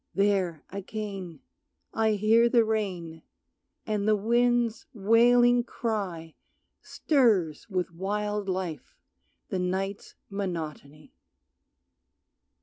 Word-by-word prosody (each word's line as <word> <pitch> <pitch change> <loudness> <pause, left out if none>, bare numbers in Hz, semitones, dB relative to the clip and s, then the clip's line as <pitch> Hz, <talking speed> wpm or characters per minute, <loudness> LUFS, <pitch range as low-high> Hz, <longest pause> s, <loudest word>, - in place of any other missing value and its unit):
There, 195 -6 +1
again, 195 -4 -6 0.5
I 220 -1 +2
hear 220 +3 +4
the 235 -2 +4
rain, 180 -7 -3 0.6
and 210 -1 -1
the 215 - +5
wind's 235 +1 +1
wailing 240 +3 +4
cry 195 -9 -4 0.5
Stirs 215 - +1
with 185 -3 -2
wild 205 +2 -2
life 180 -4 -4 0.5
the 185 - -2
night's 190 +2 -3
monotony. 160 -7 -6
200 Hz, 85 wpm, -27 LUFS, 180-220 Hz, 0.6 s, the